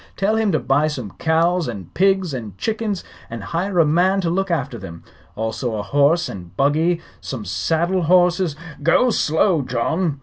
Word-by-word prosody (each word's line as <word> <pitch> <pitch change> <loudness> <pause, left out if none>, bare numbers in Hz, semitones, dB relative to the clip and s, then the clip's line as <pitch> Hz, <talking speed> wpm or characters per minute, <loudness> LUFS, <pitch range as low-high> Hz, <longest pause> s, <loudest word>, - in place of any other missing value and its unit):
Tell 205 +3 +1
him 220 -2 +1
to - - +4
buy 145 +3 +2
some 125 -10 -5
cows 165 +1 +2
and 100 -8 -7
pigs 190 -4 +2
and 110 -7 -6
chickens, 215 - -2 0.3
and 115 -2 -6
hire 180 - -2
a 165 - +6
man 180 +6 +3
to 170 -2 -1
look 195 +2 -1
after 135 -8 -2
them. 85 -4 -10 0.3
Also 110 +2 -3
a 105 - -3
horse 145 +9 +2
and 90 -3 -9
buggy, 160 +5 +2 0.2
some 115 -6 -6
saddle 165 - 0
horses 175 -1 +3 0.2
" 150 - -17
"Go 250 +6 +4
slow, 160 -2 +2
John. 145 +6 -1
160 Hz, 175 wpm, -20 LUFS, 125-180 Hz, 0.3 s, a